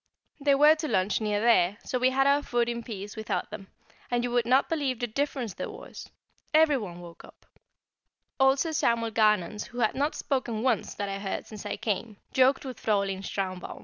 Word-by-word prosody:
They 280 -1 +4
were 295 +2 +7
to 310 - -3
lunch 190 -2 +1
near 210 -1 0
there, 205 -4 +3
so 250 - -2
we 255 +1 +4
had 270 +1 +2
our 280 +1 +4
food 240 -4 0
in 235 0 -3
peace 205 -3 -7
without 220 -1 -3
them, 200 -2 -8 0.4
and 240 0 0
you 245 - -2
would 240 -1 +1
not 260 +3 +4
believe 285 -6 -1
the 245 - 0
difference 250 -2 -2
there - - -5
was! - - -10 0.5
Everyone 260 - +2
woke 170 -1 -12
up: - - -17 0.9
Old 265 +1 +5
Sir 325 +3 -1
Samuel 230 -5 +1
Garnons, 210 -2 +2
who 240 - -12
had 220 - +2
not 290 +3 -1
spoken 240 -5 -2
once 250 -4 0
that 200 - -3
I 195 0 -4
heard 195 -1 -4
since 215 -2 -8
I - - -3
came, 215 0 -3 0.2
joked 265 +2 +3
with 255 -3 -7
Fräulein 200 -3 0
Schlarbaum. 185 -2 -4
235 Hz, 200 wpm, -28 LUFS, 205-265 Hz, 0.9 s, were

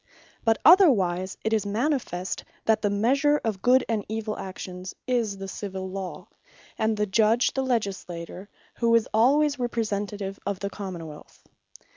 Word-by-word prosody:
But 225 -1 +3
otherwise, 195 - +5
it 220 - 0
is 215 -2 +2
manifest, 210 - -2 0.2
that 220 0 +3
the 205 - +1
measure 275 +9 +2
of 215 -4 -2
Good 255 +1 +4
and 220 -3 -1
Evill 220 -1 -3
actions, 185 -1 -7
is 235 -6 0
the 195 0 -6
Civill 190 -1 -5
Law; 190 -1 -6 0.5
and 220 0 0
the 210 - +1
Judge 220 +4 +3
the 265 - 0
Legislator, 195 -6 -3 0.3
who 230 -1 +3
is 230 - +3
alwayes 280 +5 +3
Representative 205 -4 -3
of 200 -1 -3
the 200 -1 -4
Common 185 -5 -6
wealth. 150 -1 -13
210 Hz, 150 wpm, -26 LUFS, 190-235 Hz, 0.5 s, otherwise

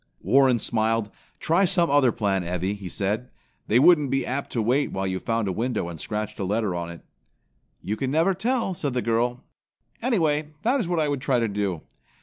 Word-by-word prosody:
Warren 130 +5 +4
smiled. 110 -2 0 0.3
"Try 170 +5 +2
some 175 -4 +2
other 140 -4 +4
plan, 100 -4 0
Evvy," 90 +3 -2
he 100 -3 -8
said. 105 +7 -2 0.4
"They 110 - +3
wouldn't 150 0 +5
be 135 +1 0
apt 135 +2 -3
to 120 - 0
wait 130 +6 +1
while 95 0 -2
you 95 0 -2
found 115 0 -1
a - - 0
window 110 -3 -2
and 80 -3 -8
scratched 105 -1 -4
a - - -1
letter 105 0 0
on 85 -1 -4
it." 85 -1 -10 0.8
"You 105 - -2
never 165 +8 +2
can 185 - -14
tell," 235 -2 0
said 145 -6 -3
the 125 - 0
girl. 120 +2 0 0.6
"Anyhow, 160 - +1 0.2
that 255 +5 +2
is 215 - -2
what 175 -1 0
I 155 - +1
would 145 -2 -2
try 135 -4 +1
to 115 - +1
do. 100 -5 -2
120 Hz, 205 wpm, -25 LUFS, 100-150 Hz, 0.8 s, wouldn't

